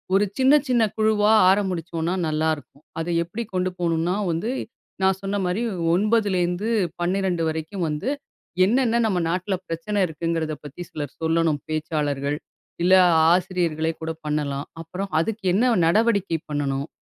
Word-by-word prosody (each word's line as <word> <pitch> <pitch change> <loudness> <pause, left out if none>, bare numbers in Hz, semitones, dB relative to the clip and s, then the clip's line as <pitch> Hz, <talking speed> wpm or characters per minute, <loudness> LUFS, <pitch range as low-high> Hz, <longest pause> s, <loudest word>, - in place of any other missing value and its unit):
ஒரு 205 +1 +4
சின்ன 265 +2 +5 0.2
சின்ன 240 -2 +3
குழுவா 215 -1 +3 0.2
ஆரம்பிச்சோம்னா 175 -3 0
நல்லாயிருக்கும். 155 -1 -2 0.2
அத 165 - -4 0.2
எப்படி 215 +8 -5
கொண்டு 185 0 0
போணும்னா 170 +1 0 0.2
வந்து, 175 +10 -2 0.5
நான் 190 0 +3
சொன்ன 200 +1 -2
மாரி 180 +6 -1 0.3
9லேருந்து 200 -2 +1 0.3
12 180 -1 0
வரைக்கும் 160 +3 -3
வந்து 150 - -2 0.6
என்னன்ன 235 +1 +2
நம்ம 185 -4 0
நாட்ல 185 +3 -1
பிரச்சனை 170 +5 -2
இருக்குங்கிறத 160 0 -2
பத்தி 150 +5 -9
சிலர் 145 -3 -6
சொல்லணும் 160 -3 +1
பேச்சாளர்கள். 150 -2 -1 0.5
இல்ல 185 +1 +4 0.4
ஆசிரியர்களே 175 -3 0
கூட 160 - -2 0.2
பண்ணலாம். 145 -2 -2 0.2
அப்புறம் 185 +4 -6
அதுக்கு 215 +1 -4
என்ன 240 +2 +3
நடவடிக்கை 200 -3 +2
பண்ணணும்? 140 0 -1
175 Hz, 125 wpm, -23 LUFS, 160-200 Hz, 0.6 s, சின்ன